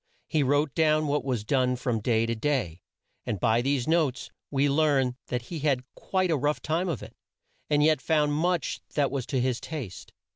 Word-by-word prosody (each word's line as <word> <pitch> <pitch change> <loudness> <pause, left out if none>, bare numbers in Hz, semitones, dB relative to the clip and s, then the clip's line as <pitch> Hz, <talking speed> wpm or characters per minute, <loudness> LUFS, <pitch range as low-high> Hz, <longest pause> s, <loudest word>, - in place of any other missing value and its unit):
He 155 -1 +2
wrote 145 +1 +2
down 155 -1 +3
what 145 0 0
was 125 -5 -1
done 125 +2 +1
from 125 -2 -1
day 115 +1 +1
to 115 - -1
day, 110 - -1 0.4
and 105 - -3
by 110 +5 +3
these 135 -1 0
notes 155 -6 +1 0.2
we 140 0 +2
learn 140 -3 +2
that 125 -1 -2
he 165 +6 -6
had 140 -4 +1
quite 185 -2 -1
a 160 - +2
rough 145 +2 0
time 170 +4 -1
of 140 -10 -3
it, 110 +2 -11 0.6
and 150 -1 +3
yet 155 -3 +3
found 150 +1 +2
much 170 0 0
that 145 -2 +2
was 135 -4 -3
to 130 - 0
his 125 -1 0
taste. 135 - -7
140 Hz, 195 wpm, -27 LUFS, 125-155 Hz, 0.6 s, down